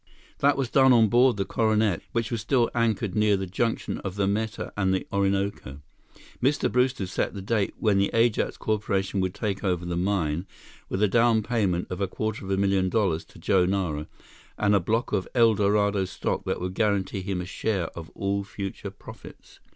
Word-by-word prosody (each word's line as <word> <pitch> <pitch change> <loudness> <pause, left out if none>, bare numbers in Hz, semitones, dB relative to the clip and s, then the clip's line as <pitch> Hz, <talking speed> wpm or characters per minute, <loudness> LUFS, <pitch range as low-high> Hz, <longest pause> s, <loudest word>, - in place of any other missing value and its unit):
That 140 0 +3
was 130 -3 -2
done 130 -1 +6
on 115 -3 +5
board 120 +1 +4
the 100 - -1
Coronet, 110 -3 +1
which 115 0 -1
was 115 -2 -2
still 120 +1 +1
anchored 110 -4 0
near 105 -2 +3
the 95 - -3
junction 115 +5 -2
of 95 -1 -5
the 100 -1 +1
Meta 105 +2 -2
and 95 -2 +1
the 95 - -3
Orinoco. 100 -8 -1 0.6
Mr. 140 +3 +1
Brewster 125 -4 +1
set 90 +3 -2
the 100 - -5
date 105 -1 0
when 105 -3 +2
the 100 - +2
Ajax 115 -1 +1
Corporation 100 -2 -1
would 95 -1 -1
take 100 -2 -3
over 90 -3 0
the 85 0 -3
mine 90 -2 -1 0.4
with 95 - -1
a - - +5
down 115 +1 +3
payment 100 -7 0
of 90 - -4
a 100 - +1
quarter 110 +3 -4
of 95 - -7
a 95 - +1
million 95 -1 +2
dollars 95 -7 +1
to - - -18
Joe 90 +2 +2
Nara 90 -6 -1 0.5
and 105 -1 +2
a 100 - +5
block 110 +6 -1
of 95 -3 -1
El 115 -2 +5
Dorado 100 -1 +2
stock 90 - -3
that - - -2
would 90 +1 -4
guarantee 100 -2 0
him 95 -1 -3
a 90 - -4
share 95 0 -2
of 80 -1 -8
all 100 0 -1
future 100 -1 -6
profits. - - -13
100 Hz, 195 wpm, -26 LUFS, 95-110 Hz, 0.6 s, done